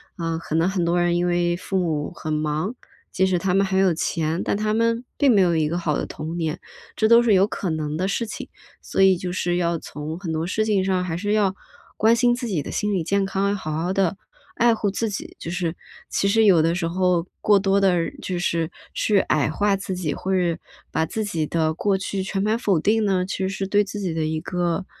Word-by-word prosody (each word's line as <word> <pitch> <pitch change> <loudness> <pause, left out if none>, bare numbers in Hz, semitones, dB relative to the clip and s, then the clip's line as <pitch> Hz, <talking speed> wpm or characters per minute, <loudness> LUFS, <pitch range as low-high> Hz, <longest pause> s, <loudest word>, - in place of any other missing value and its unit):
啊， 165 -1 -2
可 160 -1 -4
能 165 +2 +3
很 190 -2 0
多 175 +1 +2
人 175 0 +2
因 175 0 +1
为 175 0 +1
父 190 +1 -3
母 160 -3 -1
很 155 -2 -5
忙， 155 +7 -1 0.4
即 190 - +2
使 185 -1 +1
他 185 +1 0
们 195 +1 +3
很 190 0 0
有 185 -3 +4
钱， 160 +1 -1
但 - - +1
他 215 +1 0
们 230 +1 +1
并 285 - +4
没 200 - +5
有 175 -2 +3
一 155 -1 +2
个 170 +3 -2
好 165 -4 0
的 - - -2
童 160 +3 -6
年， 160 -2 -2 0.4
这 220 - +1
都 235 +1 +8
是 235 -3 +3
有 190 0 +5
可 195 - -3
能 155 -2 -2
的 185 +3 0
事 230 +4 -1
情。 220 - -7 0.3
所 - - -1
以 190 -1 +6
就 180 0 -4
是 175 -1 0
要 170 -1 0
从 155 +1 -6
很 175 -3 -5
多 160 +1 -1
事 215 +4 0
情 205 -3 +2
上 185 -1 +1
还 175 -3 -3
是 205 +3 -1
要 205 -3 +2 0.4
关 225 +2 +4
心 240 +1 +3
自 245 0 -4
己 175 -9 -1
的 - - -6
心 210 -1 -1
理 180 - 0
健 200 +4 +1
康， 195 +1 0
好 155 -5 -5
好 165 +4 -1
地 190 -2 +1 0.4
爱 235 0 +4
护 215 -2 -1
自 220 +3 -2
己。 200 - -6
就 165 - -6
是， 175 -2 -2 0.3
其 200 - +1
实 220 +2 +4
有 180 -6 +6
的 165 +1 +2
时 175 -2 -1
候 180 -1 +1
过 205 -1 +5
多 195 0 +2
地 195 - +4 0.3
就 180 -2 -3
是 165 -2 -1 0.2
去 210 -2 +2
矮 150 -4 +1
化 205 +5 +1
自 190 -1 -4
己， 165 -5 -2
或 190 - -2
者 175 -3 +1 0.4
把 160 0 +1
自 220 +6 -3
己 165 -6 -1
的 160 0 0
过 195 +4 +1
去 195 0 -3
全 195 0 -2
盘 215 +3 +1
否 200 -8 +1
定 215 +6 +2
呢， 190 -3 +1
其 195 - -4
实 190 0 0
是 195 0 -3
对 205 +1 +3
自 205 +1 -6
己 185 -4 -2
的 160 -1 -1
一 155 0 -1
个 175 +2 -2
185 Hz, 265 characters per minute, -23 LUFS, 165-200 Hz, 0.4 s, 都